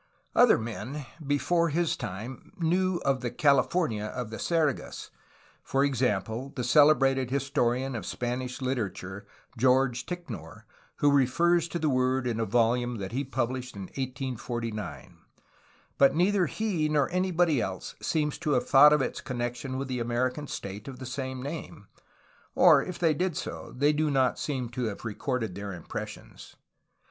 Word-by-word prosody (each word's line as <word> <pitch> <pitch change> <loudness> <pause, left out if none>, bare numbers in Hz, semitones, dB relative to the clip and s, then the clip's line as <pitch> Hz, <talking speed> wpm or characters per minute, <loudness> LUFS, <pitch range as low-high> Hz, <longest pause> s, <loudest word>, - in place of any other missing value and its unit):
Other 245 -2 +6
men 120 +5 -5 0.2
before 165 +5 +2
his 165 +2 +1
time 110 - -7
knew 180 +2 +1
of 135 -2 +1
the 120 - -2
"California" 140 -5 +2
of 115 +1 -5
the 110 - -6
Sergas, 160 -6 -1 0.2
— - - -30
for 135 +1 +1
example, 125 -1 -1
the 125 - -2
celebrated 135 -1 +4
historian 130 -1 0
of 105 -6 -5
Spanish 125 +2 -3
literature 100 -6 -3 0.3
George 130 0 +3
Ticknor, 120 - -7 0.3
who 145 - +3
refers 170 +6 +3
to 170 - -3
the 160 -2 0
word 130 -1 +1
in 115 -2 -1
a 115 - +1
volume 120 +2 +1
that 95 -2 -5
he 130 +4 -1
pubhshed 130 -1 -3
in 100 - -6
1849, 120 -3 -5 0.4
— - - -33
^but 140 +1 +6
neither 185 +1 +3
he 180 -6 -1
nor 150 -3 +2
anybody 175 -6 +2
else 95 -1 -4
seems 150 -2 -1
to 150 -3 0
have 125 - +1
thought 145 +2 +8
of 150 -3 +3
its - - -4
connection 125 0 -4
with 135 0 -3
the 130 -1 -3
Amer 120 +2 0
ican 145 +1 -8
state 100 +2 -6
of 135 -2 -7
the 130 - -8
same 130 0 -4
name, 145 -8 -7 0.7
or, - - +7
if 185 - -6
they 165 -3 +3
did 175 +1 -1
so, - - -6
they 145 +3 +3
do 155 +1 +1
not 130 -3 +2
seem 130 -5 -2
to 125 +1 -3
have 110 +1 -5
recorded 115 -1 -2
their 100 +1 -6
impressions. 90 -3 -8
130 Hz, 160 wpm, -28 LUFS, 120-150 Hz, 0.7 s, thought